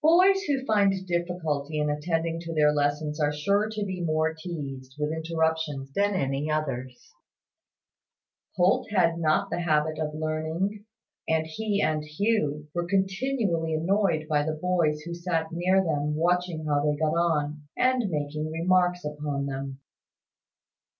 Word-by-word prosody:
Boys 370 +5 +6
who 275 -4 0
find 200 -4 +2
difficulty 170 -4 -2
in 150 - +1
attending 165 +2 -1
to 165 -1 -6
their 150 -1 +5
lessons 150 +1 0
are 145 -1 +2
sure 200 +8 +1
to 215 -1 -3
be 185 -2 -4
more 160 -1 +1
teased 140 -6 -7
with 150 0 -1
interruptions 160 -4 -1
than 205 +3 +1
any 140 -2 -1
others. 130 -5 -3 1.4
Holt 195 +8 +2
had 170 -5 +2
not 155 -2 +1
the - - -1
habit 155 -2 +1
of 150 -1 -2
learning; 160 +6 -2 0.4
and 160 0 +2
he 205 +5 -1
and 155 -1 +1
Hugh 150 -3 0
were 175 0 -2
continually 195 -3 0
annoyed 170 -2 +1
by 150 -2 +2
the 155 +1 -2
boys 165 -4 +1
who 170 +2 -6
sat 170 -2 -2
near 185 +3 +2
them 150 -3 0
watching 175 0 0
how 145 -1 +1
they 150 0 +2
got 155 +1 +1
on, 150 -3 0
and 255 -4 +2
making 150 0 -2
remarks 180 +1 +2
upon 150 -1 -3
them. 135 0 -5
160 Hz, 145 wpm, -27 LUFS, 150-185 Hz, 1.4 s, Boys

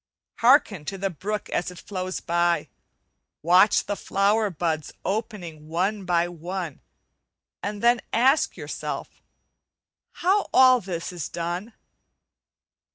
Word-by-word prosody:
Hearken 235 - +4
to 195 - -4
the 195 0 -2
brook 200 +5 -4
as 175 - -1
it 180 - -11
flows 185 0 -5
by, 170 0 +1 0.7
watch 180 +5 +5
the 205 - -2
flower 205 +3 +1
buds 160 -3 -2
opening 190 -8 -4
one 190 +5 -1
by 175 -1 +2
one, 175 -2 -6 0.8
and 205 +1 -4
then 240 0 +4
ask 265 +6 +3
yourself, - - -6 0.9
"How 395 +3 +1
all 255 -1 +6
this 175 -3 -5
is 170 -5 -5
done?" 175 +6 -4
190 Hz, 115 wpm, -25 LUFS, 175-215 Hz, 0.9 s, all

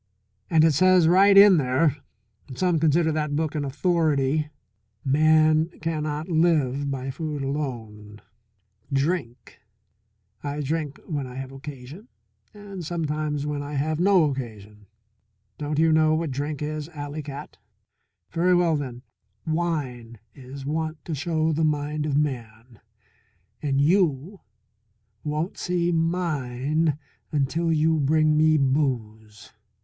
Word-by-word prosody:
"And 160 -2 +4
it 160 - +5
says 185 +2 +4
right 195 +3 +6
in 200 -2 +9
there 140 +2 +1 0.5
and 130 -3 -10
some 180 -3 +1
consider 160 +1 +2
that 150 -1 -1
Book 155 -1 -1
an 150 - -2
authority 150 -1 0 0.6
man 155 +2 +4
cannot 155 -1 -3
live 155 -5 +1
by 135 -1 -3
food 150 0 -4
alone. 115 -7 -5 0.7
Drink 135 -3 -2 0.8
I 145 +1 -3
drink 150 0 -3
when 145 -5 -3
I 125 - -10
have 135 0 -6
occasion, 140 - -10 0.4
and 200 -3 -9
sometimes 150 -3 -2
when 150 -1 -3
I 145 +1 -6
have 155 +3 -1
no 190 -1 +4
occasion 105 -5 -8 0.7
Don't 150 0 -3
you 160 +1 +4
know 155 0 +4
what 160 -2 -2
drink 145 +3 -3
is, 155 +1 -4
alley 145 -1 -6
cat? 145 0 -9 0.7
Very 175 +2 +2
well, 175 -2 +3
then, 130 -4 -5 0.4
wine 145 -8 -3 0.2
is 135 +2 -10
wont 160 +2 -2
to 165 - -4
show 160 +2 0
the 160 +2 0
mind 150 0 -1
of 145 -1 0
man, 120 -5 -4 0.8
and 140 -2 0
you 170 +2 +1 0.8
won't 155 +4 -3
see 175 -1 0
mine 155 -3 0 0.3
until 160 +3 0
you 160 0 +2
bring 155 +2 +3
me 155 0 +4
booze. 110 -7 -2
150 Hz, 125 wpm, -24 LUFS, 135-160 Hz, 0.8 s, in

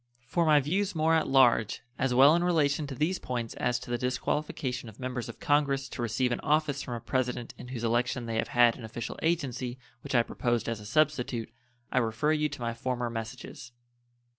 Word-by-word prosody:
For 165 +6 +1
my 150 -1 +6
views 185 +7 -1
more 160 +1 +3
at 160 -1 +2
large, 120 -5 +4 0.2
as 135 0 +1
well 135 +4 +7
in 175 - +1
relation 155 -4 +2
to 135 - -6
these 160 +7 0
points 120 -3 -4
as 125 0 0
to 125 0 -8
the 120 - 0
disqualification 125 -1 -2
of 110 - -15
members 125 -2 -4
of 115 - -9
Congress 140 -2 +1
to - - -6
receive 120 +2 0
an 120 - -1
office 150 -2 +1
from 120 - -5
a - - -4
President 125 0 -2
in - - -10
whose 125 -2 -5
election 120 +1 0
they 115 -1 -2
have - - 0
had 120 -1 +4
an - - -9
official 110 +1 -6
agency, 130 -7 -1 0.3
which 140 -1 -3
I 120 - +5
proposed 120 0 -1
as 115 -2 -2
a 105 - -10
substitute, 125 -4 0 0.4
I 130 - +3
refer 115 +5 0
you 150 -1 +1
to 140 -3 -8
my 115 -1 -1
former 120 0 -2
messages. 115 +2 -7
125 Hz, 210 wpm, -29 LUFS, 120-145 Hz, 0.4 s, well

